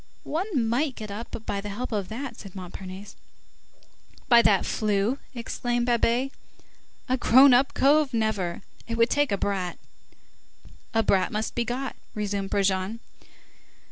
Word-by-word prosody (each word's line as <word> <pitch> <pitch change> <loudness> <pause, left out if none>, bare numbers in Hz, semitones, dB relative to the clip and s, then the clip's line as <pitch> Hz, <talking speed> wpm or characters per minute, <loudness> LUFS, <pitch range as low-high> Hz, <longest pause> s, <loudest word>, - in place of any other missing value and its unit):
"One 315 - -1
might 260 +4 0
get 215 -2 -7
up 225 +1 -7
by 200 - -2
the 205 - -6
help 245 +6 -5
of 205 -4 -2
that," 240 +2 -5
said 195 -3 -11
Montparnasse. 190 +2 -8 1.1
"By 235 -3 +7
that 200 -4 +3
flue?" 215 +4 0 0.2
exclaimed 240 0 -2
Babet, 240 +2 +1 0.8
"a 255 0 +1
grown 260 +2 +7
up 260 +3 +3
cove, 290 0 +4
never! 215 -6 -1 0.2
it 230 0 -3
would 230 +1 +3
take 290 -3 +2
a 200 - +1
brat." 190 -3 -2 1.2
"A 225 - +4
brat 190 -3 +2
must 215 +1 -2
be 240 - 0
got," 255 +3 -3 0.2
resumed 200 -2 -2
Brujon. 195 +2 0
225 Hz, 140 wpm, -26 LUFS, 200-250 Hz, 1.2 s, By